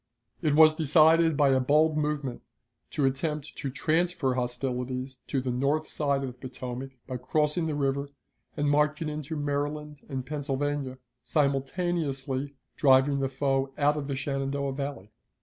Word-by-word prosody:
It 150 -4 +2
was 155 0 +8
decided 160 +1 +5
by 145 -2 +5
a 130 -1 +4
bold 150 +4 +3
movement 150 -4 -2 0.5
to 145 -3 0
attempt 150 +2 -2
to 140 - -3
transfer 160 0 +1
hostilities 125 +1 -3
to 135 - 0
the 130 -1 -2
north 140 +5 0
side 140 -2 0
of - - -2
the - - -14
Potomac, 130 +1 -7
by 130 -1 -4
crossing 150 +6 0
the 155 - -1
river 140 0 0 0.5
and 145 0 +1
marching 150 +2 +2
into 150 +1 -4
Maryland 145 0 -3
and 130 -2 -3
Pennsylvania, 145 -2 -2 0.2
simultaneously 140 0 -1 0.2
driving 140 0 +5
the 135 -1 0
foe 135 0 0
out 145 0 +3
of 145 -2 -4
the 140 - -2
Shenandoah 135 0 -2
Valley. 140 -7 -5
140 Hz, 150 wpm, -28 LUFS, 135-150 Hz, 0.5 s, was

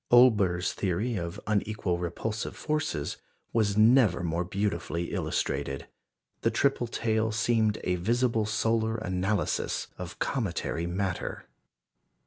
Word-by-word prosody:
Olbers's 105 -8 +5
theory 105 +6 -1
of 85 +1 -4
unequal 105 -4 0
repulsive 105 +6 -3
forces 155 - -2 0.4
was 105 -3 +2
never 110 -5 +5
more 85 +1 0
beautifully 85 -3 -2
illustrated. 70 -1 -2 0.6
The 115 - +3
triple 120 +1 +1
tail 110 -1 0
seemed 110 -1 +2
a 90 0 +1
visible 115 +3 +1
solar 110 +1 +1
analysis 95 -1 -1
of - - -6
cometary 85 +2 -1
matter. 95 0 -3
105 Hz, 110 wpm, -28 LUFS, 90-115 Hz, 0.6 s, Olbers's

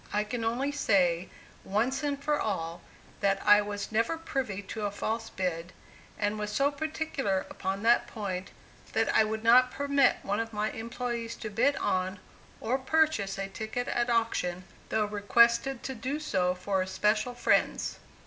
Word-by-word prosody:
I 210 0 +1
can 225 +2 -4
only 245 +5 0
say, 185 -10 +2 0.3
once 235 +9 0 0.2
for 295 +1 +1
all, 170 -5 -3 0.4
that 195 -1 +2
I 210 0 +7
was 205 0 -5
never 230 +9 +1
privy 260 -11 -3
to 210 +1 -3
a - - -2
false 225 +3 -3
bid, 180 -3 -3 0.4
and 210 0 -1
was 210 0 -3
so 275 +6 +2
particular 285 -9 -2
upon 195 +2 -3
that 235 +1 +4
point, 190 -4 -4 0.4
that 225 0 +1
I - - +6
would 220 0 -3
not 250 +2 +6
permit 280 +1 +3
one 205 +2 -1
of 225 0 -3
my 210 +1 -1
employees 235 0 -4
to 220 - -6
bid 255 +7 +2
on, 185 +1 -1 0.4
or 250 +4 0
purchase 265 -9 +1
a 195 0 -3
ticket 220 +4 -4
at 240 0 0
auction, 225 -6 0 0.3
though 220 -1 +1
requested 235 +5 +3
to 265 - -3
do 260 +5 -3
so 185 -11 0
for 190 +1 -1
especial 210 +5 0
friends. 245 - +1
220 Hz, 160 wpm, -29 LUFS, 200-245 Hz, 0.4 s, I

